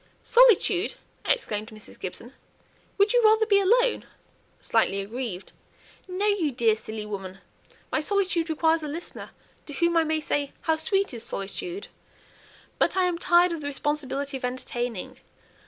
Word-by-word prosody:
"Solitude!" 450 -5 +4 0.3
exclaimed 215 - -1
Mrs. 215 -1 -12
Gibson. 230 +7 -6 0.6
"Would 405 +2 +3
you - - +5
rather 440 0 +5
be 405 -2 +4
alone?" 480 +5 +3 0.6
slightly 195 - +1
aggrieved. 205 -2 -5 0.6
"No, 370 +2 -2
you 400 -8 +2
dear 230 -3 +2
silly 220 0 -6
woman; 195 -3 -6 0.5
my 310 - +1
solitude 365 -2 0
requires 320 +1 +2
a 305 - -4
listener, 325 +4 -6 0.4
to 290 - -7
whom 340 +4 +1
I 330 - +5
may 315 0 0
say, 290 -2 -2
'How 320 - +2
sweet 395 - 0
is 235 -1 -5
solitude!' 345 - -5 0.9
But - - +2
I 375 - +4
am 355 -2 0
tired 350 0 +4
of 330 -2 -4
the 285 - -4
responsibility 285 -1 -2
of 260 - -13
entertaining. 245 -4 -4
315 Hz, 150 wpm, -26 LUFS, 240-380 Hz, 0.9 s, you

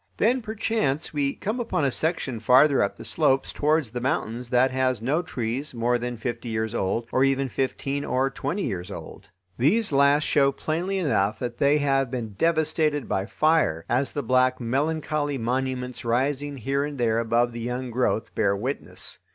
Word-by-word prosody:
Then 245 +4 +2
perchance, 215 -10 -1
we 140 -2 0
come 220 +5 -3
upon 230 -11 0
a 135 - +2
section 140 -6 -1
farther 130 +5 +5
up 100 - 0
the - - -9
slopes 135 -4 +1
towards 150 -5 +1
the 120 0 -4
mountains 120 -1 -2
that 125 +1 +3
has 130 -2 +1
no 140 +9 0
trees 125 -2 -4
more 120 +1 +1
than 120 0 -4
fifty 120 +1 -4
years 110 0 -2
old, 115 +2 -1
or 130 - +3
even 135 0 +2
fifteen 135 +2 -2
or 135 0 0
twenty 155 +9 -3
years 90 -6 -4
old. 100 - -9 0.3
These 205 - +3
last 140 +1 +4
show 140 -2 +3
plainly 175 +7 -2
enough 110 - +1
that 120 -1 -5
they 140 +1 +4
have 135 -3 +1
been 120 -3 -4
devastated 155 +1 +1
by 95 +1 -1
fire, 155 - +1
as 130 +3 0
the 145 - -2
black, 130 +1 +2
melancholy 145 +3 -1
monuments 125 +1 -2
rising 135 +4 0
here 135 +3 -1
and 145 -1 -5
there 115 -2 +1
above 115 +1 +1
the 115 0 -6
young 125 +1 -3
growth 115 -2 0
bear 100 -2 +2
witness. 130 +7 -5
130 Hz, 175 wpm, -25 LUFS, 120-145 Hz, 0.3 s, farther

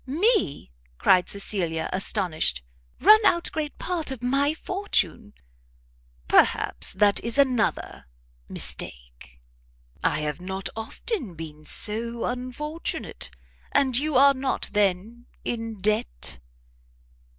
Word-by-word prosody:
"Me!" 330 - +1 0.3
cried 180 - +4
Cecilia, 175 -5 -2
astonished, 180 - 0 0.4
"run 435 +1 +8
out 345 -4 +3
great 305 -2 -4
part 345 -5 -3
of 260 -3 -6
my 275 +3 +2
fortune!" 320 - -2 1.0
"Perhaps - - +3
that 205 +1 +3
is 235 +3 0
another 260 -5 +1 0.4
mistake! - - -5 0.6
I - - +1
have 150 +2 -3
not 190 +1 -4
often 225 - -3
been 155 -1 -9
so 230 +5 0
unfortunate; 255 +6 -4 0.4
and 270 -3 +3
you 295 +3 0
are 275 +2 +7
not, 265 0 -2
then, 210 +4 0 0.2
in 225 -3 -4
debt?" 190 - -2
230 Hz, 105 wpm, -25 LUFS, 185-280 Hz, 1.0 s, run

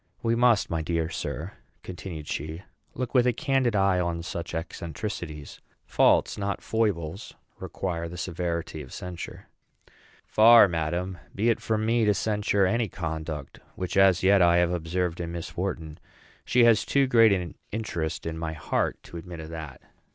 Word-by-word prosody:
We 115 - +2
must, 120 -3 +4
my 80 -1 0
dear 80 0 -1
sir," - - -4 0.3
continued 85 -4 -7
she, 80 +5 -5 0.3
"look 125 -1 -4
with 125 -2 +4
a 125 - +3
candid 135 -4 +1
eye 95 -2 +3
on 85 -1 -2
such 85 -1 -5
eccentricities. 80 -1 -6 0.2
Faults, - - +3
not 100 -2 -3
foibles, 100 -5 -2 0.2
require 85 -3 -4
the 90 - -8
severity 85 -2 -3
of 65 - -11
censure." 90 -2 -7 0.8
"Far, 115 0 +7
madam, 85 +2 -2 0.2
be 115 +4 +3
it - - -1
from 110 -1 -1
me 115 +1 +2
to 105 -1 +3
censure 105 -1 +1
any 115 +4 +1
conduct 80 -4 -5 0.2
which 90 -1 -4
as 95 -2 +5
yet 100 0 +5
I 85 0 +5
have 85 0 +3
observed 90 +1 -2
in 85 0 -5
Miss 85 -1 -6
Wharton; 80 -4 -4 0.5
she 120 +1 +4
has 115 -3 +5
too 140 -1 +2
great 115 -4 +5
an 90 -4 -1 0.2
interest 85 -7 -3
in 80 0 -4
my 80 -1 -3
heart 75 - -1
to 85 - -10
admit 85 0 -8
of 80 0 -8
that." 80 -5 -8
90 Hz, 165 wpm, -26 LUFS, 80-105 Hz, 0.8 s, Far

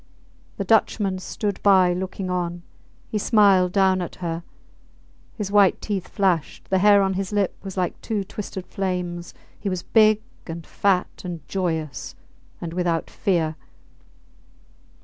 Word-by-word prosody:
The 200 - -1
Dutchman 195 -2 +2
stood 200 +1 -3
by 185 -3 +5
looking 185 +1 -4
on; 175 -1 -2 0.4
he 215 - -2
smiled 200 -4 +4
down 190 -1 +3
at 175 - -5
her; 170 -2 -3 0.9
his 205 -3 -4
white 205 -2 +5
teeth 200 -4 -3
flashed; 185 -5 -1
the 190 - +4
hair 200 0 +6
on 190 0 +1
his 190 +1 -3
lip 205 -2 0
was 195 0 -8
like 180 -1 -1
two 210 -3 -2
twisted 190 -1 -6
flames. 180 -2 -3 0.2
He 205 - -2
was 185 -2 -3
big 215 -1 +4 0.2
and 165 -1 -6
fat, 190 -3 0
and 170 -6 -6
joyous, 160 -7 -3 0.4
and 165 -1 -5
without 175 -2 -1
fear. 165 -5 0
185 Hz, 140 wpm, -23 LUFS, 175-200 Hz, 0.9 s, hair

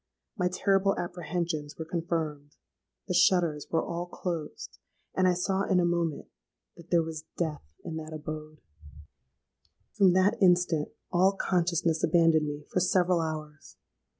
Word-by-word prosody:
My 180 -5 +1
terrible 195 +1 +2
apprehensions 170 -3 -3
were 160 - -5
confirmed: 160 -3 -3 0.5
the - - -1
shutters 175 -4 +3
were 165 - 0
all 170 +1 -4
closed; 170 -4 -5 0.3
and 185 0 +3
I 180 - +3
saw 190 +2 0
in 190 -2 +2
a 175 - +3
moment 170 -3 -1 0.5
that 170 0 -15
there 170 -2 +3
was 160 -1 -6
death 160 -4 -2 0.2
in 160 - -4
that 155 0 -7
abode! 155 0 -7 1.3
"From 195 -4 +5
that 200 +5 +2
instant 175 -4 +3 0.2
all 185 +2 +4
consciousness 170 -4 0
abandoned 165 -3 +4
me 145 0 -6
for - - +1
several 180 -1 +2
hours. 155 -2 -6
170 Hz, 140 wpm, -29 LUFS, 155-180 Hz, 1.3 s, From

